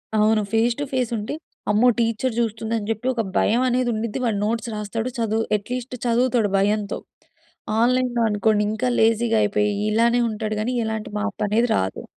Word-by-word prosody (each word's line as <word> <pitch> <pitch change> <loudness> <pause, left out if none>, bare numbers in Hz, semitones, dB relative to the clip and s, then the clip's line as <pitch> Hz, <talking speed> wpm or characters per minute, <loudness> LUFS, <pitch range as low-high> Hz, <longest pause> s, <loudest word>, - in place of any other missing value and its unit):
అవును. 215 0 +3
Face 230 +1 +2
to 290 - -1
face 250 -3 0
ఉంటే, 210 +5 -4 0.4
అమ్మో! 220 +4 +4
టీచర్ 230 +2 0
చూస్తుందని 225 -1 -2
జెప్పి 225 +3 -2
ఒక 235 - 0 0.2
భయం 235 +4 +3
అనేది 250 0 +1
ఉండుద్ది, 220 +2 -3
వాడు 220 -4 0
నోట్స్ 230 +1 -2
రాస్తాడు, 225 +3 -3
చదువు 225 0 0
అట్‌లీస్ట్ 250 +4 -5
చదువుతాడు 240 -3 +2
భయంతో. 205 +1 0 0.8
ఆన్‌లైన్‌లో 245 -1 +2
అనుకోండి, 210 0 +2
ఇంకా 245 +4 -1
లేజీగా 225 0 +3
అయిపోయి, 210 0 +1 0.2
ఇలానే 235 +3 +3
ఉంటాడు 215 0 -3
గానీ 250 +3 -1
ఎలాంటి 220 -1 -4
మార్పనేది 215 +2 0
రాదు. 95 0 -2
225 Hz, 155 wpm, -22 LUFS, 210-240 Hz, 0.8 s, అమ్మో